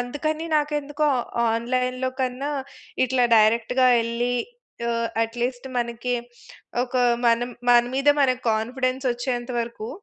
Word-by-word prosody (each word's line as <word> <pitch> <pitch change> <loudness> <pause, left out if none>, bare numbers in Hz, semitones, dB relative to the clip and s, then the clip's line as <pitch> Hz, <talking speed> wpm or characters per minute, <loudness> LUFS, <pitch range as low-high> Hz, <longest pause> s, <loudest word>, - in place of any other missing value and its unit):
అందుకని 310 +6 -3
నాకెందుకో 295 0 0 0.4
ఆన్‌లైన్‌లో 255 +2 -1
కన్నా 260 +3 -2 0.6
ఇట్లా 250 0 +2
డైరెక్ట్‌గా 230 +4 +3
వెళ్లి 235 +2 -1 0.6
ఆహ్, 230 0 -1 0.2
అట్లీస్ట్ 245 +3 -4
మనకి 240 +1 -2 0.7
ఒక 250 - -15 0.3
మన్ 235 +1 +3 0.3
మన 240 0 +7
మీద 275 +2 +1
మనకు 255 -1 +1
కాన్ఫిడెన్స్ 255 +4 -1
వచ్చేంత 245 0 -3
వరకు 230 -1 -5
250 Hz, 110 wpm, -24 LUFS, 235-265 Hz, 0.7 s, మన